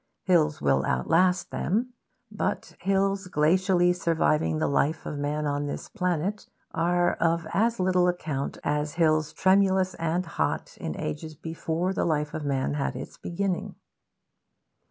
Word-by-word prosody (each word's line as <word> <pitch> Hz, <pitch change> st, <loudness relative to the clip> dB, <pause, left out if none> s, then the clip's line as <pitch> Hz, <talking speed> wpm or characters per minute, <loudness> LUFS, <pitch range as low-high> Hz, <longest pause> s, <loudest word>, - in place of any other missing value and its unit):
Hills 155 Hz, -5 st, +3 dB
will 70 Hz, -1 st, +3 dB
outlast 180 Hz, -, +2 dB
them; 240 Hz, +7 st, -1 dB, 0.4 s
but 210 Hz, -, -3 dB
hills 195 Hz, 0 st, +1 dB
glacially 180 Hz, +2 st, +3 dB
surviving 155 Hz, -, +1 dB
the -, -, +1 dB
life 150 Hz, +3 st, 0 dB
of 145 Hz, -, -4 dB
man 150 Hz, +1 st, -1 dB
on 145 Hz, 0 st, -1 dB
this -, -, -5 dB
planet 180 Hz, 0 st, -2 dB, 0.2 s
are 175 Hz, +1 st, +2 dB
of 165 Hz, 0 st, +1 dB
as 230 Hz, +2 st, +2 dB
little 180 Hz, -1 st, +3 dB
account 155 Hz, -6 st, -2 dB
as 150 Hz, 0 st, -1 dB
hills 155 Hz, -2 st, +2 dB
tremulous 190 Hz, -1 st, +3 dB
and 165 Hz, +2 st, -1 dB
hot 170 Hz, -, -2 dB
in -, -, -5 dB
ages 155 Hz, -, -5 dB
before 165 Hz, +3 st, -2 dB
the -, -, 0 dB
life 150 Hz, -2 st, 0 dB
of 155 Hz, -, -4 dB
man 140 Hz, -1 st, 0 dB
had 145 Hz, -2 st, -2 dB
its -, -, -7 dB
beginning. 185 Hz, +1 st, -2 dB
170 Hz, 140 wpm, -27 LUFS, 150-185 Hz, 0.4 s, Hills